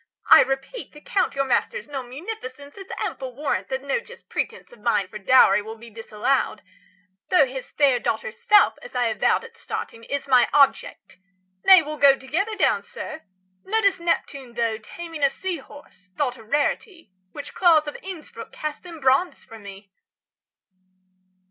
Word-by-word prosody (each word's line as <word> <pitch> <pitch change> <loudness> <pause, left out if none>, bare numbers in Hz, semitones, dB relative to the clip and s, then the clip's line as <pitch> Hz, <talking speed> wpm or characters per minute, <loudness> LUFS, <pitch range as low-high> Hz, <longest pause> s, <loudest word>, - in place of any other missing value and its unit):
I - - +11
repeat, 270 - -3
The 295 - -12
Count 375 -4 0
your 275 0 0
master's 385 - -1
known 270 -4 -6
munificence 285 - -8
Is 385 -1 -10
ample 255 -2 -4
warrant 290 +2 -2
that 265 0 -3
no 280 - 0
just 470 - -15
pretence - - -4
50 - - -15
Of - - -24
mine 210 -4 +1
for 210 +3 -9
dowry 230 +1 +5
will 220 +2 -8
be 230 +1 -13
disallowed; 220 +2 -1 0.7
Though 360 -6 +5
his 260 0 -8
fair 275 -4 +3
daughter's 485 - -3
self, 415 -1 +4
as - - -12
I 245 -2 +2
avowed 220 - +1
At 470 0 -13
starting, 230 - -6
is 280 0 -4
my 255 -2 +5
object. 290 - +2 0.5
Nay, 375 -3 +8
we'll 305 0 -6
go 275 -1 +7
Together 355 +12 -2
down, - - +2
sir. 315 - -8 0.4
Notice 400 -2 +1
Neptune, 275 -7 -2
though, 230 -2 -1
Taming 330 +7 -9
a 280 - +5
sea 375 +3 -4
horse, 270 -10 -16
thought 260 -4 0
a 225 - -14
rarity, 290 - -2 0.2
Which 290 -1 -9
Claus 330 -4 +4
of 295 - -4
Innsbruck° 365 -4 -9
cast 305 -1 -6
in 335 -2 -9
bronze 270 +7 +1
for 225 - -12
me! 200 -1 -12
280 Hz, 170 wpm, -23 LUFS, 245-345 Hz, 0.7 s, I